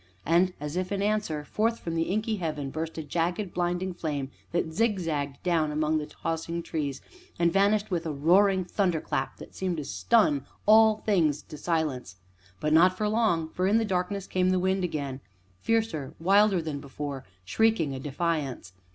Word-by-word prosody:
And, 180 +2 +3
as 150 +2 -5
if 185 +1 -2
in 200 0 -1
answer, 205 -8 -1
forth 225 +6 0
from 165 - -5
the 165 0 0
inky 215 +2 0
heaven 155 -6 -3
burst 160 +2 -4
a 160 - -3
jagged, 175 +5 -2
blinding 180 +1 -1
flame, 145 -5 -3 0.2
that 165 -2 -1
zigzagged 165 -10 -1
down 165 -4 +1
among 155 +1 +1
the 150 - -5
tossing 165 +2 -4
trees, 145 -5 -3 0.4
and 170 -1 +2
vanished 200 +1 +2
with 170 -2 -1
a - - -1
roaring 185 +6 +3
thunder 180 -2 0
clap 135 -2 -3
that - - -12
seemed 185 -3 -2
to 150 - -4
stun 155 - +2 0.2
all 220 0 +6
things 160 -8 +2
to 155 - -10
silence. 150 - -2 0.4
But 150 +6 0
not 180 +3 +5
for 210 - 0
long, 210 -8 +1
for 185 +3 -1
in 210 +3 +4
the 225 - +1
darkness 190 0 -2
came 185 -1 +1
the 185 - +2
wind 190 +1 +1
again 140 -6 -3 0.4
fiercer, 220 -12 -1
wilder 195 +1 +4
than 150 -3 -4
before, 140 -1 -6 0.2
shrieking 170 - +2
a 135 - -5
defiance. 140 - -2
170 Hz, 175 wpm, -27 LUFS, 150-195 Hz, 0.4 s, all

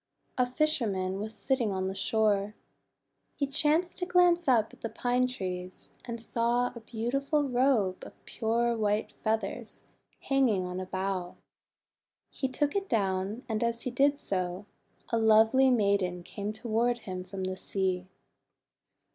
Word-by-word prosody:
A 250 -1 +2
fisherman 220 -9 0
was 220 +2 -4
sitting 255 -6 0
on 190 -1 -1
the 190 - -2
shore. 210 0 +1 0.8
He 280 - 0
chanced 305 +6 +1
to 360 - -2
glance 355 -2 +4
up 230 -4 +3
at - - -17
the 230 - -3
Pine 250 +2 +1
Trees, 185 -6 -6
and 235 -1 -5
saw 235 +2 0
a 235 - -8
beautiful 275 +6 -1
robe 245 -7 +2
of - - -13
pure 235 +1 0
white 210 -1 0
feathers 220 +1 -2 0.4
hanging 250 -9 +2
on 180 0 -4
a 185 - -5
bough. 185 -1 -3 1.0
He 265 - -2
took 290 +4 -1
it 395 -1 -1
down, 195 +2 0
and 220 -1 -1
as 235 0 -1
he 255 - -2
did 280 +3 +3
so, 185 -4 -3 0.4
a 230 - +1
lovely 225 +4 +5
maiden 200 -6 +1
came 205 +3 -5
toward 235 +2 0
him 185 -2 -4
from 190 +1 -6
the 185 0 -2
sea. 185 -1 -2
225 Hz, 145 wpm, -29 LUFS, 195-255 Hz, 1.0 s, lovely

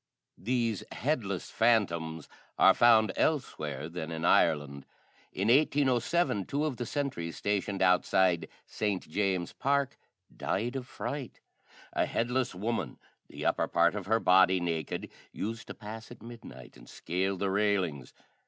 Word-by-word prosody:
These 115 -2 -1
headless 115 - -2
phantoms 85 -9 +1 0.3
are - - +7
found 110 -3 +5
elsewhere 75 - -1
than 85 -1 -6
in 80 +1 -3
Ireland. 70 -4 +2 0.4
In 95 +3 -2
1807 135 - +2
two 145 +2 -1
of 140 -6 -2
the 120 - -4
sentries 125 - -3
stationed 100 -1 -1
outside 90 -1 +3 0.2
St. 105 -3 -2
James's 95 0 -1
Park 140 0 0 0.4
died 120 +7 -2
of 130 -2 -4
fright. 135 -2 -6 0.5
A - - +1
headless 125 -2 -1
woman, 110 +5 -3 0.3
the - - -7
upper - - +1
part 85 +1 +3
of 100 -3 -5
her 110 +2 +3
body 95 -1 +5
naked, 85 -4 -3 0.2
used 115 +2 -5
to - - -8
pass 110 +1 -9
at - - -13
midnight 115 - -11
and - - -15
scale 95 +3 -2
the 95 +1 -1
railings. 95 -10 0
100 Hz, 135 wpm, -30 LUFS, 85-120 Hz, 0.5 s, are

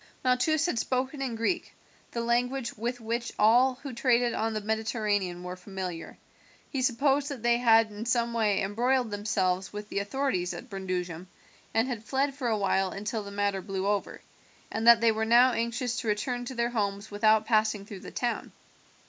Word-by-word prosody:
Malchus 275 +5 +2
had 305 -10 0
spoken 265 +3 -1
in 255 -4 -2
Greek, 325 +10 -1 0.4
the 235 - -3
language 240 +2 0
with 240 +3 -3
which 235 +1 -3
all 245 +5 +5
who 275 -3 -6
traded 240 -1 +2
on 225 0 -1
the - - 0
Mediterranean 210 -4 -1
were 180 0 -5
familiar. 180 -3 -6 0.5
He 270 - -1
supposed 275 +3 +2
that 265 -6 -6
they 240 0 +4
had 225 -2 +4
in 210 +3 -6
some 235 0 +1
way 215 -4 +1
embroiled 240 +4 +1
themselves 195 -3 -1
with 210 0 -7
the - - -1
authorities 200 -4 -1
at 250 - -10
Brundusium, 180 -2 -4 0.4
and 225 +3 +2
had 240 -4 -4
fled 270 +4 0
for 265 -3 -3
awhile 195 -3 +1
until 210 +3 -4
the 200 - -8
matter 200 -1 -1
blew 190 0 -3
over, 205 0 -1 0.5
and 225 - -1
that 235 -1 +8
they 230 -1 +5
were 220 0 -1
now 240 +3 +6
anxious 235 +1 -2
to 235 - -5
return 245 +4 -1
to 260 - -6
their 235 0 0
homes 205 -2 -2
without 215 +1 +3
passing 215 -2 +1
through 200 -2 -9
the - - -9
town. 240 -1 -3
225 Hz, 180 wpm, -28 LUFS, 205-245 Hz, 0.5 s, that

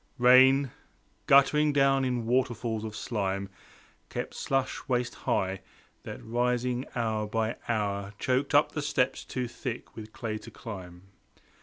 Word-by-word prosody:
Rain, 130 +2 +6 0.6
guttering 150 +2 +5
down 135 -1 +3
in 125 -3 -1
waterfalls 120 -2 0
of 110 -1 -6
slime 100 -4 -2 0.6
Kept - - -4
slush 135 -1 -1
waist 125 -1 0
high, 95 0 -1 0.4
that - - -9
rising 125 +2 0
hour 110 -3 -1
by 110 +1 -1
hour, 100 -2 -1
Choked 130 +4 0
up 145 - +5
the 150 - -3
steps 145 -3 0
too 125 -1 -3
thick 120 0 -6
with 110 -1 -9
clay 110 -2 -4
to - - -11
climb. 90 -5 -9
120 Hz, 135 wpm, -28 LUFS, 110-130 Hz, 0.6 s, Rain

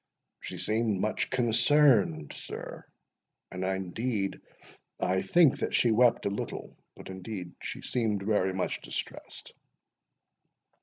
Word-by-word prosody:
"She - - -7
seemed 110 -2 0
much 110 +2 -1
concerned, 120 - +3
sir; - - -8 0.7
and 90 0 -4
indeed 95 +3 -2 0.6
I 95 +1 +1
think 150 - +4
that - - -1
she 120 - +4
wept 120 +2 +4
a 100 - +1
little—but 100 - -7
indeed 95 -1 -6
she - - -6
seemed 110 -5 -1
very 100 -2 +2
much 95 0 -2
distressed." - - -7
105 Hz, 110 wpm, -29 LUFS, 95-120 Hz, 0.7 s, think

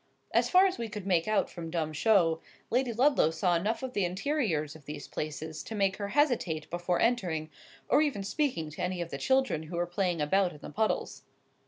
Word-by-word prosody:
As - - +3
far 370 +1 +6
as 375 -1 0
we 230 -1 -3
could 205 -2 -6
make 175 -4 +2
out 215 -1 +2
from 165 -2 -7
dumb 160 -2 -2
show, 165 -2 +3 0.3
Lady 250 0 +2
Ludlow 255 - +4
saw 175 +2 +1
enough 220 +8 -1
of 255 -1 -4
the 200 - +1
interiors 180 - -1
of 155 -3 -14
these 150 0 -7
places 155 +1 -5
to 225 - -7
make 195 -2 +1
her 200 -1 -3
hesitate 240 - +1
before 175 +1 0
entering, 175 -10 0 0.4
or - - +4
even 280 -10 0
speaking 200 - -1
to - - -7
any 180 0 -1
of 170 -1 -4
the - - -4
children 265 -11 +2
who 160 +2 -7
were 175 - +1
playing 175 -1 -1
about 180 +5 +2
in 150 - -13
the - - -9
puddles. 220 +6 -1
185 Hz, 210 wpm, -30 LUFS, 160-230 Hz, 0.4 s, far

